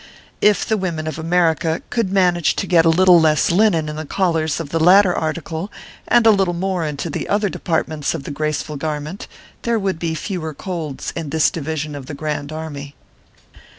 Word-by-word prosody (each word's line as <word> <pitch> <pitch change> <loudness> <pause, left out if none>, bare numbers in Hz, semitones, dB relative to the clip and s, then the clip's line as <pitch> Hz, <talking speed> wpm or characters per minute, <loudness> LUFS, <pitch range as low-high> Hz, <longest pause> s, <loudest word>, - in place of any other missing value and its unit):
If 210 -1 +3
the 220 - 0
women 170 -5 -3
of 155 +1 -4
America 165 -1 +1
could 225 -6 0
manage 180 -4 +2
to - - -2
get 170 -3 +4
a - - +5
little 180 +1 +6
less 155 0 +3
linen 175 -4 +3
in 150 0 -5
the 155 - -4
collars 165 -5 0
of 160 -4 -5
the 165 - -1
latter 180 +2 +6
article, 160 +3 -3 0.4
and 240 -1 +4
a 225 - +8
little 195 -4 +1
more 185 -1 -1
into 150 +1 -3
the 155 - -4
other 205 0 +1
departments 160 -4 -2
of 150 - -6
the - - -6
graceful 155 0 -3
garment, 150 +4 -5 0.3
there 235 -1 0
would 190 -5 -2
be 165 -1 -2
fewer 160 -3 -4
colds 165 -7 -5
in 165 -3 -4
this 155 +1 +2
division 155 -1 -4
of 140 -3 -8
the 145 - -6
Grand 150 -1 -4
Army. 145 -3 -7
165 Hz, 190 wpm, -19 LUFS, 155-185 Hz, 0.4 s, a